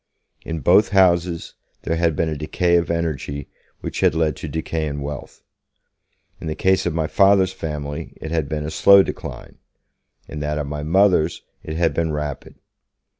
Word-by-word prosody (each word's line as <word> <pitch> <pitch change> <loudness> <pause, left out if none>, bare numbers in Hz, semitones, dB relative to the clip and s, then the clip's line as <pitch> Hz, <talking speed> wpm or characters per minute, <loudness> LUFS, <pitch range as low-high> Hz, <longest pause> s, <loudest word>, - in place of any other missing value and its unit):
In 80 -2 -4
both 95 +7 +5
houses 90 -3 +2 0.3
there 80 - -1
had 85 -2 +1
been 80 - 0
a 80 - -2
decay 85 +4 0
of 85 - -1
energy 75 -4 -3 0.3
which - - -5
had - - +3
led 80 -3 +1
to - - -6
decay 80 +1 -3
in 70 -1 -4
wealth. 70 -2 -7 1.0
In - - -7
the 75 - -2
case 95 -1 +2
of 85 - -1
my 80 -2 0
Father's 95 +1 +4
family 75 -5 -5
it 80 - -6
had 80 -4 -1
been 75 -1 -3
a 75 - -4
slow 100 +3 +7
decline; - - -8 0.7
in 75 - -7
that 75 0 -2
of 75 - -2
my 75 +1 -5
Mother's, 85 0 +2 0.2
it 80 - -6
had 85 -1 +2
been 80 -1 0
rapid. 75 -2 -5
80 Hz, 175 wpm, -21 LUFS, 75-85 Hz, 1.0 s, slow